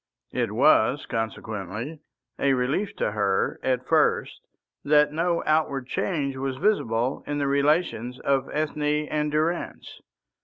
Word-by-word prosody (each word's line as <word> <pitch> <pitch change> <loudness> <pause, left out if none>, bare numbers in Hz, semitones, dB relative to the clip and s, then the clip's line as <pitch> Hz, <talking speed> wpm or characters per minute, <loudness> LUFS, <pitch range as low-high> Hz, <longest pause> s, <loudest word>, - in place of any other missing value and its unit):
It - - -1
was - - +4
consequently 110 - -4 0.4
a 140 -1 +3
relief 135 +11 -1
to - - -1
her 100 -2 0
at 125 -1 0
first - - +1 0.4
that 150 0 +4
no 170 +2 0
outward 150 -4 +1
change 140 0 -2
was 130 -1 -3
visible 130 - 0
in 145 - -2
the 145 - 0
relations 140 -3 +1
of 135 -1 +1
Ethne 150 0 0
and 150 0 0
Durrance. 160 +3 -2
140 Hz, 125 wpm, -25 LUFS, 125-155 Hz, 0.4 s, was